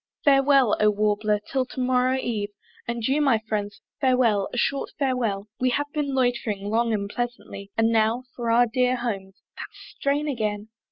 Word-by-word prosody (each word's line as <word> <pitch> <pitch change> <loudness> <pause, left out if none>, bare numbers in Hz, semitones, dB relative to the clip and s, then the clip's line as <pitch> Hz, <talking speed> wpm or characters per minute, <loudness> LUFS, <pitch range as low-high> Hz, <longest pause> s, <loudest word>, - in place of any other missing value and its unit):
Farewell, 275 -4 +5
O 215 - +5
Warbler! 210 0 +1
till 265 -1 0
to 255 - -9
morrow 255 0 +2
eve, 215 -5 -2 0.4
And 235 -1 -3
you, 280 +3 +2
my 270 -6 +4
friends! 205 -1 -3 0.2
farewell, 245 -7 +2
a - - -5
short 275 +3 0
farewell! 240 -8 -1
We 255 - +2
have 290 +4 -2
been 285 -3 -1
loitering 235 -6 -1
long 230 +1 +1
and 200 -2 -1
pleasantly, 240 -3 -5
And 225 0 +3
now 225 +2 +2
for 235 -2 -3
our 235 +2 +5
dear 250 +2 +1
homes. 195 -6 -5
That - - -6
strain 285 +2 -2
again! 215 -5 -2
235 Hz, 170 wpm, -25 LUFS, 210-260 Hz, 0.4 s, Farewell